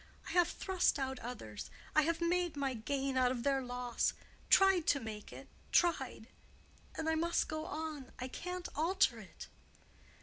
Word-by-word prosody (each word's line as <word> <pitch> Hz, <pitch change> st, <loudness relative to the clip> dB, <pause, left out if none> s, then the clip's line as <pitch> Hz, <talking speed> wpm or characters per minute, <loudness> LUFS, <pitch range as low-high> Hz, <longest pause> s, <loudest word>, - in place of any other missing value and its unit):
"I -, -, -5 dB
have 355 Hz, -1 st, +4 dB
thrust 380 Hz, -5 st, +1 dB
out 265 Hz, -2 st, -2 dB
others—I 230 Hz, -, -3 dB
have 330 Hz, +3 st, 0 dB
made 345 Hz, -2 st, +1 dB
my 275 Hz, -2 st, 0 dB
gain 270 Hz, +3 st, -2 dB
out 250 Hz, -1 st, +4 dB
of 240 Hz, -2 st, -3 dB
their 275 Hz, -1 st, +2 dB
loss—tried 250 Hz, +8 st, +2 dB
to 280 Hz, -, +4 dB
make 220 Hz, -3 st, -7 dB
it—tried. 275 Hz, -10 st, 0 dB, 0.7 s
And 320 Hz, -1 st, -3 dB
I 320 Hz, -, +3 dB
must 335 Hz, +2 st, +1 dB
go 310 Hz, 0 st, -3 dB
on. 310 Hz, -6 st, -5 dB
I 255 Hz, 0 st, -4 dB
can't 360 Hz, +6 st, -5 dB
alter 320 Hz, -6 st, +2 dB
it." 200 Hz, -5 st, -10 dB
280 Hz, 145 wpm, -35 LUFS, 250-340 Hz, 0.7 s, have